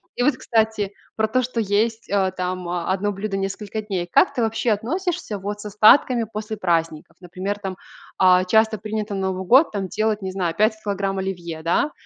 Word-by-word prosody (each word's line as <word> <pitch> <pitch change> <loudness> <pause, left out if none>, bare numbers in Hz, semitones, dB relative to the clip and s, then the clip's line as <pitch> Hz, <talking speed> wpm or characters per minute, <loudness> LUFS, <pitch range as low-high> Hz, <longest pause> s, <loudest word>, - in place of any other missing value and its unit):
И 245 - 0
вот 295 - +2
кстати 220 -3 0 0.2
про 220 0 +2
то, 255 +4 +1
что 245 -1 -3
есть, 220 +2 0
э, 195 -2 +1
там, 180 -1 -4
э, 175 -1 -2
одно 205 +2 -1
блюдо 195 0 -4
несколько 200 +2 -4
дней. 190 -4 -3
Как - - +4
ты 245 - -1
вообще 225 +1 0
относишься, 320 - -2
вот, 205 +2 -5
с - - -10
остатками 220 +4 +5
после 215 +1 -4
праздников? 165 -4 -1
Например, 185 +3 -5
там, 195 -2 -5 0.5
э, 185 0 +5
часто 220 +1 +3
принято 215 0 -4
на 190 -1 -1
Новый 185 0 -5
год, 265 - +5
там, 195 -2 -2
делать, 215 0 0
не 190 -1 -4
знаю, 180 -3 -2
5 215 +4 +3
килограмм 195 -1 -2
оливье, 175 -4 -4
да, 175 - +1
205 Hz, 195 wpm, -22 LUFS, 185-220 Hz, 0.5 s, остатками